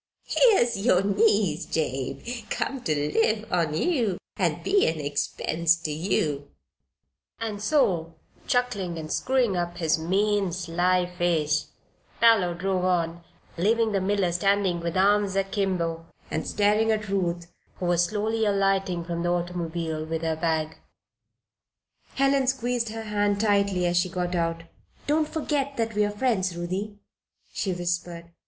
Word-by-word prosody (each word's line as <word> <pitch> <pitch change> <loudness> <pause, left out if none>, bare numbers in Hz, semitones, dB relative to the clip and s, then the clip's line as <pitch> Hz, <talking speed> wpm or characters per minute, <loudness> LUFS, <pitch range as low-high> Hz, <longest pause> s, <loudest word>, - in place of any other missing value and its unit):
Here's 385 - +4
yer 195 -3 +3
niece, 200 -4 +2
Jabe, 135 -5 -2 0.3
come 270 -2 -2
ter 155 - +1 0.2
live 220 +1 +1
on 165 -4 +1
ye 230 - +1 0.2
an' - - -1
be 395 +1 +3
an 160 -1 -1
expense 155 +3 0
to 165 -2 -5
ye," 150 -3 0 1.0
and 215 -3 -4
so, 180 - +1 0.3
chuckling 210 -9 0
and 155 -1 -6
screwing 255 -6 +1
up 175 0 -2
his 160 -2 +1
mean, 195 +3 +1
sly 180 +1 +1
face, 170 -4 0 0.5
Parloe 210 -7 +4
drove 185 +1 -1
on, 170 -2 0 0.3
leaving 220 +5 +2
the 195 -2 0
miller 195 -2 +1
standing 190 0 +1
with 170 +1 -3
arms 200 0 +3
akimbo, 185 -4 -1 0.2
and 160 - -2
staring 210 +2 +2
at 215 -1 -1
Ruth, 175 -3 -2 0.2
who 180 - -5
was 175 0 +3
slowly 220 +3 -1
alighting 195 -3 +1
from 170 0 -4
the 175 - 0
automobile 170 -2 -2
with 160 +1 -4
her 160 -1 0
bag. 160 -1 -1 1.4
Helen 275 -1 +2
squeezed 245 -3 0
her 225 +1 -6
hand 205 -1 0
tightly 200 -3 +2
as 175 0 +1
she 175 +1 +2
got 180 -1 -2
out 165 -1 -1 0.4
"Don't 305 +1 +2
forget 290 -3 -2
that 225 -1 -1
we 210 - +1
are 205 - +1
your 205 - -9
friends, 190 -8 0
Ruthie," 190 +4 -4 0.6
she 195 - -1
whispered. 175 -1 -3
185 Hz, 145 wpm, -26 LUFS, 170-210 Hz, 1.4 s, Here's